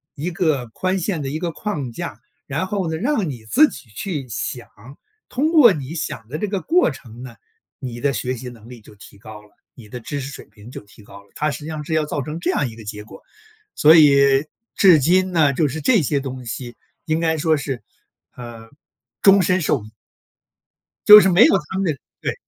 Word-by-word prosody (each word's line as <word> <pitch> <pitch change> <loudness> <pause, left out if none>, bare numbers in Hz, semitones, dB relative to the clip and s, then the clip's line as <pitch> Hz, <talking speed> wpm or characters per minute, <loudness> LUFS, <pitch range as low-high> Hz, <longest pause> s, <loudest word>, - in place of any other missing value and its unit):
一 155 +4 -4
个 155 -7 -1
宽 185 +11 -2
限 180 -2 -2
的 135 - -4
一 155 +3 -4
个 170 0 -3
框 150 - -5
架， 115 -2 -7 0.3
然 150 +6 -3
后 190 -3 -2
呢， 160 - -2
让 230 - -1
你 120 -5 -9
自 300 - +5
己 120 - -13
去 140 - -5
想， 120 +2 -5 0.6
通 295 +5 0
过 295 -9 +7
你 145 -2 -7
想 115 -8 -5
的 140 +6 -5
这 210 - -3
个 195 -1 -3
过 350 - +2
程 120 -3 -13
呢， 125 -3 -10 0.4
你 120 -3 -7
的 140 - +1
学 125 +1 -3
习 125 +1 -8
能 115 -2 -15
力 125 -2 -12
就 105 - -17
提 100 - -16
高 110 0 -12
了， 105 - -22 0.3
你 115 -4 -14
的 125 +4 -8
知 145 +5 -5
识 135 0 -6
水 - - -11
平 105 +2 -16
就 140 - -9
提 105 +1 -19
高 100 0 -14
了， 100 - -28
他 150 - -1
实 - - -6
际 150 - -9
上 155 -2 -5
是 160 - -4
要 155 -1 +1
造 145 -1 -3
成 150 +5 -6
这 - - -1
样 140 - -1
一 110 - -12
个 115 - -12
结 105 0 -7
果。 - - -14 0.5
所 155 +2 +6
以 140 -2 +5 0.3
至 180 -6 +6
今 185 +6 +2
呢， 155 -5 +3
就 150 +3 +1
是 160 +4 -5
这 220 - +3
些 140 0 -1
东 130 -2 -7
西 120 +1 -7 0.3
应 155 0 0
该 160 -1 0
说 155 +1 +1
是， 135 -4 -5 0.5
呃， 115 -2 -10 0.5
终 195 -1 +6
身 185 +1 +1
受 140 -5 0
益。 110 - -14 1.2
就 210 0 +11
是 190 - +3
没 180 +6 +6
有 - - +5
他 190 - -3
们 195 - 0
这 165 - +1 0.3
对。 - - -3
145 Hz, 240 characters per minute, -20 LUFS, 120-170 Hz, 1.2 s, 就